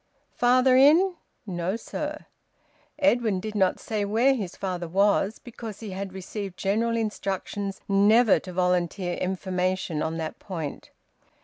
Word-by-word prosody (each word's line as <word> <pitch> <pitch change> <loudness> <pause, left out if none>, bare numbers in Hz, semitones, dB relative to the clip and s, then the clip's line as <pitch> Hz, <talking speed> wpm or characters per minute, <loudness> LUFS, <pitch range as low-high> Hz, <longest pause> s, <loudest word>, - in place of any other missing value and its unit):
"Father 255 +1 +4
in?" 315 +8 +6 0.3
"No, 180 0 -2
sir." 300 +6 -5 0.7
Edwin 240 -9 +2
did 215 +3 -5
not 190 -3 +2
say 215 -2 -2
where 230 +7 +3
his 205 -9 -4
father 180 -3 -3
was, 200 +3 +2
because 225 -3 -9
he 215 -3 -7
had 195 +1 -5
received 190 0 -6
general 230 +4 0
instructions 200 -2 -3
never 210 +3 +5
to 185 - -9
`volunteer 180 0 0
information' 185 -3 -1
on 160 +1 -2
that 160 -1 -5
point. 165 -7 -6
200 Hz, 130 wpm, -26 LUFS, 185-230 Hz, 0.7 s, in